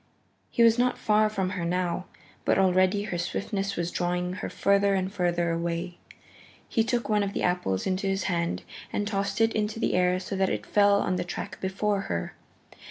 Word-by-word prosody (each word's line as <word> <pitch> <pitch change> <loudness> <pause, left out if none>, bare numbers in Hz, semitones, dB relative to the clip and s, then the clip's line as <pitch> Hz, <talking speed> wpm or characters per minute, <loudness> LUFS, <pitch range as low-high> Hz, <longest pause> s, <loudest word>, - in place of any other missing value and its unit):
He 235 - +3
was 230 +1 +5
not 250 0 +2
far 215 0 +3
from 190 -3 -2
her 185 -3 -3
now, 180 +1 -1 0.4
but - - +2
already 185 +1 +3
her 175 -4 -3
swiftness 195 +2 -2
was 170 0 -2
drawing 180 0 -1
her 185 - -5
further 200 0 +2
and 190 0 -1
further 175 -2 +1
away. 170 +1 -3 0.7
He 225 - +1
took 240 +1 -1
one 210 -1 +2
of 200 0 -2
the - - -2
apples 180 - 0
into 190 +1 -1
his 195 0 0
hand 170 -2 -1 0.3
and 205 - -1
tossed 200 0 -1
it 225 0 +3
into 215 +1 -1
the - - 0
air 180 0 +2
so 190 +2 -5
that 190 0 +2
it - - -3
fell 200 -1 +4
on 185 - 0
the - - -1
track 175 - -6
before 195 +1 0
her. 85 -1 -2
190 Hz, 195 wpm, -27 LUFS, 180-205 Hz, 0.7 s, was